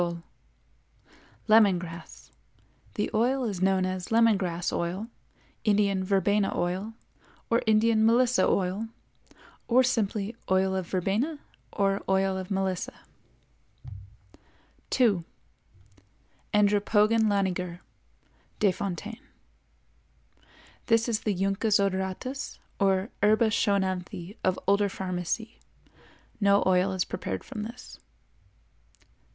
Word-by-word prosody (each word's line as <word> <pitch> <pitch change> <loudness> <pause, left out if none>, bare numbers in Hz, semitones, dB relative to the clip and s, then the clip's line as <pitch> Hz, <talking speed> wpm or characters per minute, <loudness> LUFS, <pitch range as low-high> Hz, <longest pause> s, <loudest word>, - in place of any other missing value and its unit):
—Lemon 215 -4 +6
Grass. 170 - -10 0.6
The 210 - -1
oil 250 +4 +1
is 200 -6 -3
known 190 0 +2
as 185 +1 -4
Lemon 230 -1 +5
Grass 175 -3 -2
Oil, 185 +6 -3 0.5
Indian 200 -2 +2
Verbena 200 +1 +1
Oil 190 +6 -2 0.6
or 230 - +3
Indian 220 0 +4
Melissa 245 +2 +4
Oil, 195 +4 0 0.8
or 250 +2 +5
simply 220 -3 -1
Oil 190 0 +2
of 185 -2 -3
Verbena 205 - -1 0.3
or 195 -1 0
Oil 190 0 +2
of 185 -1 -5
Melissa. 190 -2 -2 1.9
2. 215 -9 +2 1.3
Andropogon 210 +2 +3
laniger 180 -3 -1 0.8
Desf.—This 200 +1 -1 1.9
is 225 -3 0
the 210 -3 -1
Juncus 195 +3 +1
odoratus 195 +7 -2 0.2
or 195 +1 +1
Herba 215 +2 +4
Schoenanthi 190 -3 -1
of 185 0 +1
older 200 +1 +3
pharmacy. 190 +4 -4 0.8
No 200 -1 +4
oil 185 +1 +3
is 185 -2 -1
prepared 185 - -5
from 235 -6 -7
this. 230 +3 -9
200 Hz, 95 wpm, -27 LUFS, 185-220 Hz, 1.9 s, Lemon